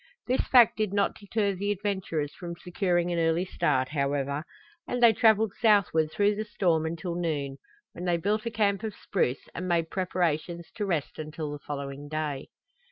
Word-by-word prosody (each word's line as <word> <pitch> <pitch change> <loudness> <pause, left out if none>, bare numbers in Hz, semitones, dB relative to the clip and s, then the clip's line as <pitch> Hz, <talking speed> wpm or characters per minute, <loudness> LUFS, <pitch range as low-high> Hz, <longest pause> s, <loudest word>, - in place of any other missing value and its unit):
This 255 +2 +1
fact 245 -3 +5
did 215 -3 0
not 200 0 +2
deter 205 0 -1
the 200 +2 -3
adventurers 190 -7 -2
from 170 -2 -7
securing 175 0 0
an 170 - 0
early 165 +2 +2
start, 130 -7 0
however, 140 0 -1 0.4
and 245 - -2
they 235 -2 +7
traveled 220 -1 +4
southward 200 -8 +4
through 205 +3 +2
the 210 +1 -3
storm 175 -6 +1
until 170 +2 -4
noon, 150 -6 -2 0.3
when 175 - -7
they 175 -1 +2
built 210 +6 -1
a - - +1
camp 205 -3 +1
of 220 -3 -4
spruce 140 -9 -1
and 180 +2 -4
made 170 -2 +1
preparations 175 -2 -1
to 205 -2 -3
rest 160 -6 -2
until 155 0 -5
the 145 - -6
following 140 0 -6
day. 150 -3 -3
175 Hz, 175 wpm, -28 LUFS, 155-205 Hz, 0.4 s, they